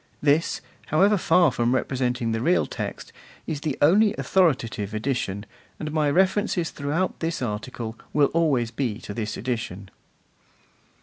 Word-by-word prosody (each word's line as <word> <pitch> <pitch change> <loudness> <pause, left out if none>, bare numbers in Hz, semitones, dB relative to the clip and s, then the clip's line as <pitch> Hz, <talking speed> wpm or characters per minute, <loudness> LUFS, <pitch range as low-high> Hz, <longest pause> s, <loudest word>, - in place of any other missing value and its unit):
This, 150 +3 +2 0.3
however 195 +7 +4
far 175 -4 +4
from 120 +1 +1
representing 125 -3 -1
the 110 0 -1
real 85 -9 +3
text, - - -6 0.3
is 150 -2 -4
the 150 -3 -2
only 205 +7 +5
authoritative 120 - +1
edition, 110 -4 -2 0.3
and 155 -1 -4
my 155 -1 +2
references 185 +1 +1
throughout 150 +6 -2
this 165 0 -2
article 115 0 -4
will 145 -2 +3
always 140 -9 +2
be 120 -4 -2
to 100 - -7
this 110 0 -3
edition. 105 -6 -4
135 Hz, 135 wpm, -25 LUFS, 115-165 Hz, 0.3 s, only